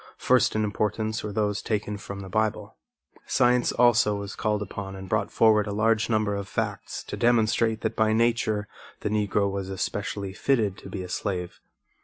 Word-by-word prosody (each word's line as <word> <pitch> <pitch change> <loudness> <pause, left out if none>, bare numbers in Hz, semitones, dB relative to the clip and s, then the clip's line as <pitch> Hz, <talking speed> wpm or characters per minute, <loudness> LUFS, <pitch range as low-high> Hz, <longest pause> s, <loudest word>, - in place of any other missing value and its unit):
First 125 -3 +3
in 110 - +1
importance 110 +1 -1
were 105 - -4
those 105 0 0
taken 105 -1 -2
from 100 -1 -7
the 95 - -8
Bible. 110 +1 -1 0.5
Science 125 -1 +3
also 120 -3 +4
was 100 -1 -6
called 105 -1 0
upon 95 -1 -6
and 95 0 -8
brought - - 0
forward 110 -2 +4
a - - -3
large 110 +2 +2
number 110 -2 +1
of 100 -1 -4
facts - - -3
to - - -6
demonstrate 115 -1 +2
that - - -2
by 110 -1 +3
nature 110 -2 +1 0.3
the - - -1
Negro 105 -1 +1
was 95 -1 -3
especially 100 0 -3
fitted 110 -4 +1
to - - -10
be 95 -3 -5
a - - -7
slave. 90 -1 -3
105 Hz, 180 wpm, -26 LUFS, 100-110 Hz, 0.5 s, also